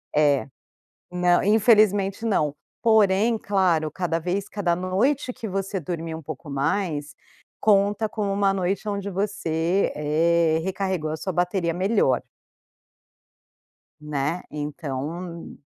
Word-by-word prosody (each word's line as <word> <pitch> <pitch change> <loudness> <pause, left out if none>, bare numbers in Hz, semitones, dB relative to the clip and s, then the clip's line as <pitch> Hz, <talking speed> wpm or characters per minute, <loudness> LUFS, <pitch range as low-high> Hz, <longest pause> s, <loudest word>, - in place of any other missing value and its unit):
É. 145 -2 +3 0.7
Nã 180 0 +3
infelizmente, 210 -1 +4
não. 155 -10 +1 0.3
Porém, 220 0 +4
claro, 185 -7 +1
cada 170 0 -1
vez 185 +4 -2
cada 190 -4 0
noite 245 +10 0
que 245 -3 -6
você 195 +1 -2
dormir 165 0 -4
um 160 - -7
pouco 155 0 -8
mais 145 +1 -1 0.5
conta 205 +1 +3
como 210 -2 -2
uma 195 0 +2
noite 195 +3 -1
onde 200 -1 -3
você, 190 -2 0
eh, 160 +2 +2
recarregou 190 -4 -2
a 155 - -2
sua 190 - -4
bateria 175 -1 0
melhor. 195 +5 +2 1.8
Né, 150 +2 -2
então... 150 +3 -5
180 Hz, 115 wpm, -24 LUFS, 160-200 Hz, 1.8 s, infelizmente